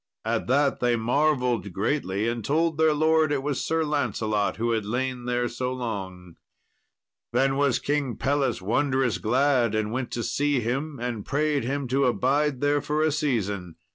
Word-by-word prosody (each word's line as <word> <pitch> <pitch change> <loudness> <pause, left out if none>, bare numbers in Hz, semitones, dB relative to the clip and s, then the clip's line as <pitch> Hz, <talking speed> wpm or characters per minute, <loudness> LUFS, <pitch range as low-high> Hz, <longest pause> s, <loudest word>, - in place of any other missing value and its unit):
At 115 0 -1
that 140 +2 +2
they 120 -1 +2
marvelled 125 - +1
greatly, 100 - -1
and 115 -1 -2
told 160 +3 0
their 160 0 +5
lord 155 0 +3
it 140 -2 0
was 145 -2 -2
Sir 160 0 0
Lancelot 110 -8 -1
who 115 +2 0
had 110 -2 0
lain 125 +3 -3
there 125 0 0
so 125 +2 -3
long. 95 -8 -6 1.0
Then 135 +2 +2
was 140 -3 +2
King 140 -4 -1
Pelles 140 -7 0
wondrous 130 +3 +1
glad 125 -1 +2
and 110 0 -1
went 125 +1 -3
to 120 - -2
see 145 +1 +1
him, 135 +6 -2
and 120 -3 -3
prayed 145 -2 0
him 140 +1 -2
to 135 +2 +2
abide 135 +2 +1
there 145 0 +2
for 150 +2 0
a 155 - +2
season. 100 - -2
130 Hz, 170 wpm, -25 LUFS, 115-145 Hz, 1.0 s, their